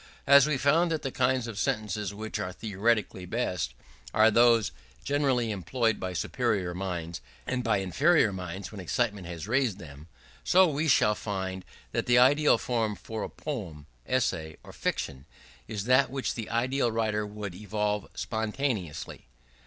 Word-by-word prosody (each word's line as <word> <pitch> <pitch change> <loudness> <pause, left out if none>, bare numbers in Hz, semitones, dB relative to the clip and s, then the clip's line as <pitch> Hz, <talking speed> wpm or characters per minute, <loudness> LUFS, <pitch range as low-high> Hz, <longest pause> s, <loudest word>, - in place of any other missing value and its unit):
As 140 0 +7
we 150 -3 +1
found 155 +6 +3
that 160 -1 -1
the 135 - -2
kinds 130 -1 +1
of 115 -3 -6
sentences 105 -6 -1
which 110 +2 -5
are 90 - -3
theoretically 105 -2 -1
best, 90 - -2 0.4
are 110 +1 +6
those 115 -1 +4 0.3
generally 135 -5 +1
employed 110 - 0
by 95 -1 -4
superior 90 0 -1
minds, 85 -4 -4 0.2
and 130 -1 -2
by 115 -3 +2
inferior 110 - +3
minds 90 0 -6
when 105 -3 -7
excitement 105 -1 -1
has 85 +1 -6
raised 120 -4 +1
them; 75 -4 -11 0.4
so, 185 +1 +6
we 155 +1 -1
shall 105 -6 +4
find 95 -3 -4 0.3
that - - -2
the 120 0 +5
ideal 140 +3 +5
form 115 -3 -1
for 110 +4 -6
a - - -3
poem, 95 - -6 0.2
essay, 85 -11 -1
or - - -12
fiction, 65 +1 -3 0.4
is 105 -3 -4
that 130 +4 +4
which 135 0 -2
the 115 -3 -6
ideal 120 +2 +1
writer 110 -1 0
would 105 -2 -6
evolve 105 +1 -2
spontaneously. 110 - -3
110 Hz, 155 wpm, -28 LUFS, 95-125 Hz, 0.4 s, As